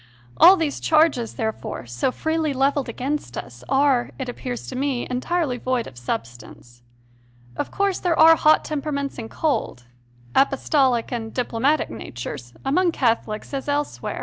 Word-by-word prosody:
All 370 +3 +8
these 315 -4 -1
charges, 305 -7 +2
there 220 -1 0
fore, 215 - -7
so 120 - -1
freely 315 +1 -1
levelled 275 0 +1
against 260 - -3
us, 120 0 -8
are, 270 -3 +3
it 265 - -4
appears 245 0 -5
to 260 - -7
me, 265 -2 -1
entirely 255 +1 -1
void 255 -2 -1
of 130 - -11
substance. 120 0 -7 0.7
Of - - -3
course 395 -2 0
there 345 -3 0
are 325 +1 +8
hot 310 0 +4
temperaments 280 -2 -3
and 225 -1 -6
cold, 250 - -2 0.5
apostolic 270 -3 +2
and 225 -2 -4
diplomatic 255 +5 0
natures, 120 +1 -7
among 340 +5 +2
Catholics, 230 -3 -1
as 275 0 -4
elsewhere. 290 +1 -2
265 Hz, 150 wpm, -23 LUFS, 225-300 Hz, 0.7 s, All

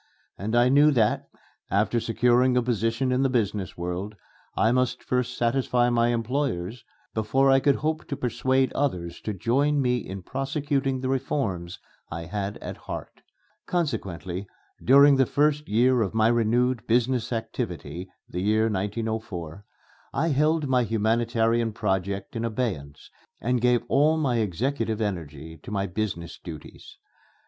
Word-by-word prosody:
And 110 +4 -3
I 120 +1 +5
knew 145 +3 +6
that, 110 -5 +1 0.4
after 105 +4 +2
securing 125 +2 +3
a 125 - +3
position 120 +2 0
in 125 +1 +2
the 135 - +2
business 105 -6 -1
world, 90 +4 -4 0.4
I 110 - +4
must 125 0 0
first 125 0 -1
satisfy 120 0 +2
my 120 0 +3
employers 120 -3 -2 0.3
before 130 +5 +2
I 135 - +6
could 140 0 +3
hope 155 +1 -2
to 140 - -4
persuade 130 +2 +1
others 85 -12 -2
to 110 - -3
join 140 +9 +1
me 125 -2 +2
in 95 -5 -7
prosecuting 135 - -1
the 130 - -2
reforms 110 -10 -2 0.3
I 85 +1 -5
had 100 +3 -4
at - - -6
heart. - - -8 0.5
Consequently, 100 - -2 0.4
during 140 +2 +7
the 135 -2 +3
first 150 0 +1
year 120 +3 +3
of 105 0 -1
my 110 0 +4
renewed 120 +1 +1
business 120 0 +1
activity 95 - -4 0.2
(the 90 - -4
year 110 +3 +2
1904), 105 -4 -3 0.5
I 165 - +1
held 155 +1 +2
my 130 -1 +3
humanitarian 115 0 +1
project 100 -1 -2
in 115 - -2
abeyance 105 - -4 0.3
and 125 +1 0
gave 125 -1 +3
all 155 +3 +3
my 135 -6 +1
executive 115 - -1
energy 80 -6 -4
to - - -10
my 100 -1 -1
business 90 -3 -4
duties. 80 -4 -10
115 Hz, 145 wpm, -26 LUFS, 100-130 Hz, 0.5 s, during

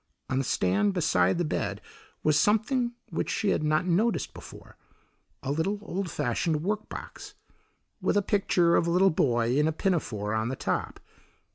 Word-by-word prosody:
On 130 - +1
the - - 0
stand 100 -2 +1
beside 90 - +2
the 175 - 0
bed 155 - -2 0.4
was 150 -1 +3
something 235 - +2 0.2
which - - -2
she 210 - 0
had - - +1
not 155 +3 +1
noticed 205 +6 +1
before: - - -12 0.7
a 135 - -2
little 160 +8 0
old 195 -3 -3
fashioned 150 +4 -1
work 210 +3 -2
box 415 +1 -9 0.7
with - - +1
a 205 - +2
picture 185 -4 +2
of 170 - +2
a - - +1
little 185 +3 +4
boy 120 -5 +1
in 150 +2 +3
a - - +2
pinafore 120 - -1
on 110 0 0
the 130 - -3
top. - - -3
165 Hz, 170 wpm, -27 LUFS, 130-200 Hz, 0.7 s, little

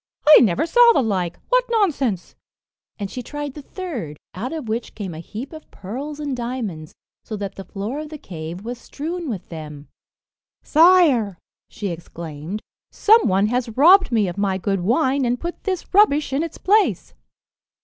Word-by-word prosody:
"I 305 - +10
never 215 - +2
saw 475 +6 +6
the 275 - +2
like 185 -6 -1
what - - +4
nonsense!" 280 - 0 0.6
and 200 -2 -5
she 250 - -5
tried 290 +2 -6
the 295 - -9
third, 270 - -6 0.2
out 230 +8 -5
of 315 -7 -5
which 225 +2 -3
came 195 -5 -5
a 160 - -8
heap 220 - -8
of 315 -1 -11
pearls 275 +10 -7
and 290 -3 -3
diamonds, 235 -11 -5 0.3
so 220 - -6
that 200 -1 -5
the 195 - -8
floor 210 +9 -5
of 305 0 -6
the 305 - -7
cave 170 - -8
was 240 0 -5
strewn 330 +2 -5
with 205 -7 -6
them. 150 -3 -9 0.7
"Sire," 310 - +5 0.3
she 205 -2 -5
exclaimed, 170 +2 -7 0.3
"some 445 +2 +4
one 195 0 +3
has 240 -2 -2
robbed 365 +5 +6
me 215 -4 +2
of 175 +2 -5
my 195 -2 +1
good 195 0 -1
wine, 260 - +1
and 245 0 0
put 345 +1 -6
this 375 -1 -3
rubbish 305 -9 +4
in 275 - +1
its 330 -1 -5
place." 415 +2 +2
245 Hz, 175 wpm, -21 LUFS, 195-310 Hz, 0.7 s, I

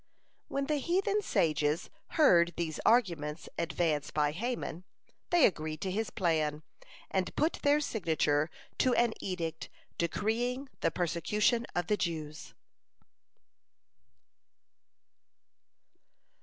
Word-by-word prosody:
When 275 0 -2
the 300 +1 0
heathen 390 +7 +1
sages 155 - +1 0.3
heard 175 - +5
these 160 -3 -2
arguments 170 -10 +2
advance 165 -3 0
by 150 -1 +1
Haman, 195 -2 -4 0.5
they 350 -4 +6
agreed 155 -4 -1
to 190 - -2
his 220 +4 -1
plan, 155 -6 0 0.5
and - - -1
put 320 - +1
their 290 +1 +4
signature 160 - +1 0.3
to 255 -1 +3
an 235 -2 +3
edict 165 -4 -4 0.3
decreeing 240 - -1
the - - +2
persecution 210 +7 +1
of 175 -1 0
the 210 +4 +1
Jews. 155 -4 -4
175 Hz, 100 wpm, -31 LUFS, 155-240 Hz, 0.5 s, they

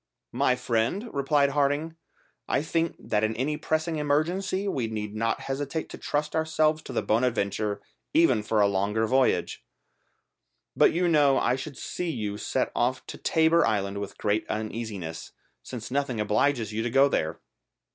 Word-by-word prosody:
"My 125 0 +2
friend," 125 - -1
replied 140 0 +2
Harding, 145 +3 0 0.5
"I - - +1
think 165 +1 0
that 105 0 -1
in 110 +1 0
any 135 +6 -1
pressing 155 +2 -1
emergency 175 +7 0
we 130 -11 -1
need 105 -2 -4
not 115 +1 -1
hesitate 140 +3 -3
to - - -8
trust 150 +1 -2
ourselves 155 -1 +2
to - - -7
the - - 0
Bonadventure 105 -3 0 0.3
even 130 -9 +4
for 105 0 +1
a 100 - +5
longer 100 +3 0
voyage; 130 +3 +1 1.1
but - - +5
you 175 +2 +1
know 145 -5 +4
I 125 - +2
should 135 0 -7
see 180 -1 -4
you 105 -8 -3
set 130 - -1
off 125 +2 0
to - - -8
Tabor 160 +1 +3
Island 100 -2 0
with 100 -1 -6
great 105 +1 0
uneasiness, 110 -6 -5 0.3
since 120 - -7
nothing 135 -4 -1
obliges 110 +1 +1
you 110 - -1
to 120 - -1
go 135 +3 +5
there." 80 - -1
130 Hz, 160 wpm, -27 LUFS, 110-155 Hz, 1.1 s, a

